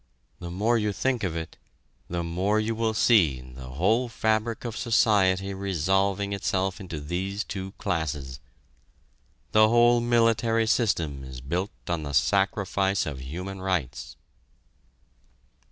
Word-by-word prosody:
The 85 Hz, -, -7 dB
more 110 Hz, +7 st, +1 dB
you 105 Hz, -1 st, -1 dB
think 125 Hz, +1 st, -1 dB
of 90 Hz, -4 st, -1 dB
it, 80 Hz, -1 st, -6 dB, 0.5 s
the 85 Hz, 0 st, -2 dB
more 95 Hz, +6 st, 0 dB
you 110 Hz, +1 st, -1 dB
will 110 Hz, -1 st, -1 dB
see 90 Hz, -, +4 dB
the 65 Hz, 0 st, -11 dB
whole 110 Hz, -, +1 dB
fabric 110 Hz, +1 st, -1 dB
of 115 Hz, -2 st, -4 dB
society 100 Hz, -4 st, +2 dB
resolving 95 Hz, +1 st, 0 dB
itself 95 Hz, 0 st, -1 dB
into 85 Hz, -5 st, -6 dB
these 95 Hz, +7 st, -3 dB
two 95 Hz, -1 st, -6 dB
classes. 75 Hz, -, -3 dB, 1.1 s
The 110 Hz, 0 st, +5 dB
whole 120 Hz, +1 st, +5 dB
military 115 Hz, -1 st, +2 dB
system 85 Hz, -, 0 dB
is 65 Hz, -1 st, -8 dB
built 90 Hz, +10 st, -2 dB, 0.2 s
on 85 Hz, -2 st, -1 dB
the 70 Hz, -1 st, -5 dB
sacrifice 95 Hz, +4 st, +1 dB
of 70 Hz, -4 st, -5 dB
human 90 Hz, +8 st, -6 dB
rights." 80 Hz, -10 st, -3 dB
95 Hz, 130 wpm, -26 LUFS, 85-110 Hz, 1.1 s, The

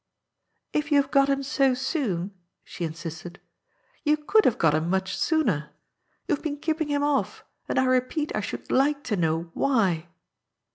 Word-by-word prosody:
If 295 Hz, -1 st, 0 dB
you 290 Hz, -, +6 dB
have 275 Hz, 0 st, -1 dB
got 275 Hz, -1 st, +4 dB
him 275 Hz, 0 st, +1 dB
so 270 Hz, -2 st, +2 dB
soon," 240 Hz, -, -2 dB, 0.3 s
she 175 Hz, -, -5 dB
insisted, 165 Hz, +2 st, -7 dB, 0.3 s
" -, -, -38 dB
you 300 Hz, 0 st, +3 dB
could 415 Hz, +9 st, +3 dB
have 240 Hz, -, +3 dB
got 160 Hz, -3 st, +3 dB
him 155 Hz, +2 st, 0 dB
much 190 Hz, 0 st, 0 dB
sooner. 210 Hz, -, +1 dB, 0.6 s
You 345 Hz, -, +2 dB
have 285 Hz, -, -3 dB
been 295 Hz, -2 st, -2 dB
keeping 315 Hz, +1 st, -1 dB
him 290 Hz, -1 st, 0 dB
off, 290 Hz, -1 st, -1 dB, 0.2 s
and -, -, -1 dB
I 260 Hz, -, +4 dB
repeat 255 Hz, +4 st, 0 dB
I 215 Hz, -, 0 dB
should -, -, -6 dB
like 285 Hz, +2 st, +2 dB
to 220 Hz, -, -1 dB
know 165 Hz, -1 st, -1 dB
why." 190 Hz, -11 st, +1 dB
260 Hz, 180 wpm, -26 LUFS, 175-290 Hz, 0.6 s, you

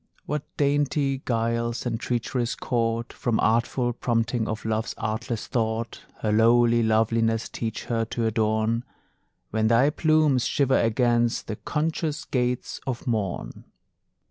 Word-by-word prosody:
What 150 Hz, -1 st, -2 dB, 0.2 s
dainty 140 Hz, -1 st, +1 dB
guiles 115 Hz, 0 st, -1 dB
and 115 Hz, -2 st, -1 dB
treacheries 120 Hz, 0 st, -1 dB
caught 115 Hz, -1 st, -1 dB
From 120 Hz, -3 st, -1 dB
artful 120 Hz, +2 st, +1 dB
prompting 115 Hz, -1 st, 0 dB
of 110 Hz, 0 st, -4 dB
love's 110 Hz, 0 st, -1 dB
artless 110 Hz, +1 st, -3 dB
thought 115 Hz, 0 st, -2 dB, 0.2 s
Her 110 Hz, -, 0 dB
lowly 115 Hz, +2 st, +4 dB
loveliness 115 Hz, 0 st, +2 dB
teach 110 Hz, -2 st, -4 dB
her 115 Hz, -1 st, -1 dB
to 115 Hz, +1 st, -2 dB
adorn, 110 Hz, +1 st, +1 dB, 0.7 s
When 110 Hz, 0 st, +1 dB
thy 120 Hz, +6 st, +4 dB
plumes 155 Hz, -5 st, +3 dB
shiver 135 Hz, -2 st, +2 dB
against 120 Hz, +1 st, +2 dB
the 110 Hz, -, -4 dB
conscious 155 Hz, +3 st, -2 dB
gates 125 Hz, -1 st, -2 dB
of 125 Hz, -2 st, -3 dB
morn! 105 Hz, -6 st, -3 dB
115 Hz, 125 wpm, -25 LUFS, 115-125 Hz, 0.7 s, lowly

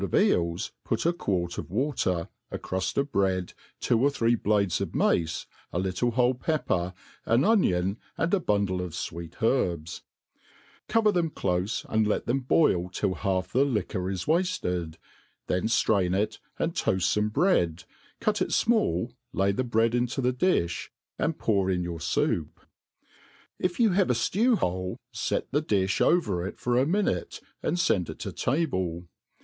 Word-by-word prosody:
of 95 Hz, -, -1 dB
eels 85 Hz, +4 st, +2 dB
put 115 Hz, -, -1 dB
a 170 Hz, -, +3 dB
quart 90 Hz, -, -2 dB
of -, -, -6 dB
water, 95 Hz, -, 0 dB, 0.2 s
a -, -, -4 dB
cruft 95 Hz, 0 st, -3 dB
of 140 Hz, 0 st, 0 dB
bread, 95 Hz, -2 st, 0 dB, 0.3 s
two 120 Hz, -2 st, +2 dB
or 140 Hz, -, +5 dB
three 120 Hz, -4 st, +1 dB
blades 100 Hz, -5 st, +1 dB
of -, -, -4 dB
mace, 80 Hz, -1 st, +1 dB, 0.3 s
a -, -, -3 dB
little 95 Hz, +6 st, 0 dB
whole 125 Hz, +1 st, +3 dB
pepper, 125 Hz, -, -1 dB, 0.4 s
an 115 Hz, +3 st, +4 dB
onion, 100 Hz, -, +2 dB, 0.2 s
and 165 Hz, +3 st, 0 dB
a 200 Hz, -, +4 dB
bundle 100 Hz, -, 0 dB
of 90 Hz, -3 st, -5 dB
fweet 85 Hz, +4 st, -6 dB
herbs; 85 Hz, -, 0 dB, 0.9 s
cover 220 Hz, -2 st, +3 dB
thetn 175 Hz, -4 st, +1 dB
clofe, 90 Hz, 0 st, -1 dB
and 110 Hz, -1 st, +2 dB
let 105 Hz, -, 0 dB
tbem 130 Hz, +2 st, 0 dB
borl^ 90 Hz, -, +2 dB
till 95 Hz, -, 0 dB
half 95 Hz, +3 st, -2 dB
the 130 Hz, -, +4 dB
liquor 100 Hz, -8 st, -1 dB
is 95 Hz, -2 st, -3 dB
wafted; 120 Hz, -, 0 dB, 0.5 s
then 90 Hz, +2 st, 0 dB
ftrain 95 Hz, -5 st, +2 dB
it, 105 Hz, -, -2 dB, 0.2 s
and -, -, -1 dB
toaft 95 Hz, -1 st, +1 dB
fome 105 Hz, +3 st, +1 dB
bread, 90 Hz, -, +2 dB, 0.4 s
cut -, -, 0 dB
it -, -, +1 dB
fmall, 120 Hz, -, +1 dB, 0.2 s
lay 100 Hz, +1 st, +2 dB
the 115 Hz, +6 st, -1 dB
bread 115 Hz, -1 st, +2 dB
into 120 Hz, +2 st, 0 dB
the 125 Hz, -1 st, +1 dB
diih, 125 Hz, -, 0 dB, 0.3 s
and 160 Hz, -, 0 dB
pour 100 Hz, -4 st, +1 dB
in 90 Hz, -1 st, 0 dB
your 85 Hz, -1 st, -4 dB
foup* 90 Hz, -, 0 dB, 1.1 s
If 180 Hz, +3 st, -1 dB
you 225 Hz, -4 st, +5 dB
have 185 Hz, 0 st, +2 dB
a -, -, +4 dB
ftew 220 Hz, -, +2 dB
hole, 90 Hz, -, -2 dB, 0.2 s
fet -, -, -2 dB
the 145 Hz, +3 st, +2 dB
difh 100 Hz, -9 st, 0 dB
over 100 Hz, -, +2 dB
it -, -, -8 dB
for 120 Hz, 0 st, +1 dB
a 135 Hz, -, +2 dB
minute, 175 Hz, -, 0 dB, 0.2 s
and 175 Hz, -, -1 dB
fend 95 Hz, -, +1 dB
it -, -, -7 dB
to -, -, -4 dB
table. 95 Hz, -, -1 dB
105 Hz, 165 wpm, -27 LUFS, 90-140 Hz, 1.1 s, or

